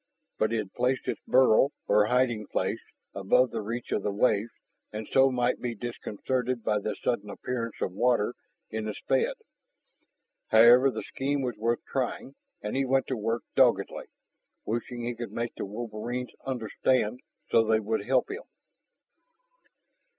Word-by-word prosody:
But 110 +1 +2
it 115 - +1
had 105 -3 -4
placed 125 +1 0
its - - -2
burrow, 130 0 +5 0.2
or 105 0 +4
hiding 120 -4 +1
place, - - -1 0.3
above 100 +6 +3
the - - -3
reach 115 +3 -5
of - - +1
the - - -1
waves 105 +1 +2 0.4
and 110 0 -5
so 135 0 +5
might 125 -1 0
be 120 -1 -3
disconcerted 120 +2 -3
by 105 -1 +1
the 105 +1 -3
sudden 105 -4 -1
appearance 115 +1 -4
of - - 0
water 120 0 +2 0.4
in 110 0 -3
its 105 - -5
bed. - - +2 1.1
However, 120 +4 +7
the - - -4
scheme 140 +1 -2
was 125 -3 -2
worth 115 +2 -1
trying, 135 0 -3 0.3
and 105 - -3
he 135 - +2
went 135 0 +2
to 130 - 0
work 115 +1 -2
doggedly, - - +3 0.6
wishing 120 +2 -3
he 120 +1 -2
could 120 0 -6
make 115 0 -3
the - - -5
wolverines 120 +3 -5 0.2
understand 125 -1 0 0.3
so 115 - +5
they 110 0 +3
would 110 -1 -1
help 130 +3 +1
him. 450 - -5
120 Hz, 160 wpm, -28 LUFS, 110-125 Hz, 1.1 s, However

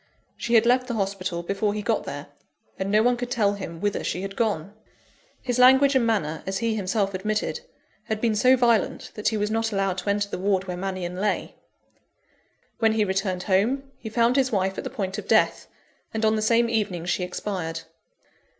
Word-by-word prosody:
She 235 - -1
had 225 0 +6
left 250 +1 +3
the 240 - -3
hospital 195 -4 -2
before 205 +3 -1
he 210 - -3
got - - 0
there; - - -6 0.5
and 190 0 -2
no 215 +2 +4
one 245 0 +3
could 245 0 -4
tell 210 -5 +2
him 170 -5 -7
whither 205 +2 -1
she 180 - -2
had 195 0 -5
gone. 205 -5 -1 0.7
His 250 -1 -1
language 265 +2 +6
and 255 -3 +3
manner, 160 -9 0
as 195 0 -1
he 230 +2 0
himself 200 -1 -1
admitted, 215 - -2 0.5
had 220 -1 -2
been 225 -1 +1
so 255 +5 +4
violent 235 -3 +1
that 210 - -3
he 220 - +1
was 210 0 -1
not 225 0 0
allowed 195 -2 0
to 185 - -4
enter 205 0 +1
the 200 - -5
ward 190 0 +1
where 180 -1 -5
Mannion 180 -1 -4
lay. 205 +2 -1 1.3
When 225 -1 +3
he 215 -1 +2
returned 190 -1 -1
home, 245 +8 +1
he 220 - -6
found 235 +3 +2
his 260 -1 +2
wife 190 -2 0
at - - -5
the - - -4
point 195 -2 -3
of - - -9
death; - - +2 0.5
and 220 0 +1
on 215 0 +3
the 215 - -1
same 230 +2 +3
evening 205 -7 -1
she 180 +1 0
expired. 180 -3 -4
210 Hz, 205 wpm, -25 LUFS, 190-230 Hz, 1.3 s, had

